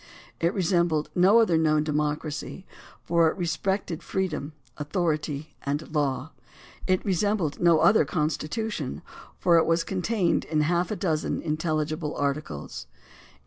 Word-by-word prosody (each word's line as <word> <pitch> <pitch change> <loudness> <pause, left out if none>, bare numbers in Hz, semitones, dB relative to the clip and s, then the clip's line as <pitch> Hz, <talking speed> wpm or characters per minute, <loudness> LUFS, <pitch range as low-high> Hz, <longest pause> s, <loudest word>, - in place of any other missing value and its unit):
It 170 +3 +1
re 190 - 0
sembled 170 -3 +1
no 190 +5 +5
other 180 -8 +3
known 155 -1 +3
democracy, 150 +3 -3 0.4
for 170 -1 +3
it - - -5
respected 175 0 -2
freedom, 160 -6 -3 0.2
authority, 150 -1 -2
and 145 +2 -3
law. 140 -1 -1 0.6
It 185 -1 +1
resembled 190 -5 0
no 170 -2 +4
other 205 -4 +5
constitution, 155 - -2 0.3
for 170 -2 +4
it - - +1
was 165 0 +2
contained 190 -1 0
in 155 -1 0
half 175 +3 +1
a 215 - -2
dozen 160 -6 -1
intelligible 155 -1 -2
articles. 140 - -3
160 Hz, 130 wpm, -26 LUFS, 150-180 Hz, 0.6 s, no